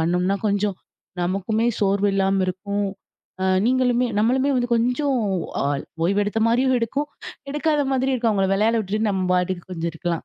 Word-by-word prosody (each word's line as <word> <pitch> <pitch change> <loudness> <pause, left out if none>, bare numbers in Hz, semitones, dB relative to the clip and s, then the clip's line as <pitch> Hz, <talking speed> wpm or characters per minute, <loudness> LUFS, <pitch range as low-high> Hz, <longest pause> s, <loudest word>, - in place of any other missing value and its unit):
பண்ணோம்னா 180 +4 +1
கொஞ்சம் 205 -1 0 0.5
நமக்குமே 195 +5 0
சோர்வு 200 0 +2
இல்லாம 195 0 +2
இருக்கும். 200 +2 -2 0.6
அ - - +1 0.2
நீங்களுமே 250 -1 +2
நம்மளுமே 260 +6 +2
வந்து 245 -1 0
கொஞ்சம் 250 +4 +1 0.5
ஆ - - 0 0.4
ஓய்வு 200 +4 +2
எடுத்த 215 +2 -1
மாதிரியும் 255 +2 +3
இருக்கும், 275 +6 -2 0.4
எடுக்காத 300 +1 +1
மாதிரியும் 265 0 +1
இருக்கும். 230 -2 +1
அவங்கள 195 -1 +1
விளையாட 215 +4 +2
விட்டுட்டு 215 +2 -1
நம்ம 190 -2 -1
பாட்டுக்கு 180 -1 -1
கொஞ்சம் 170 -1 -2
இருக்கலாம் 170 +1 -3
210 Hz, 150 wpm, -22 LUFS, 190-250 Hz, 0.6 s, மாதிரியும்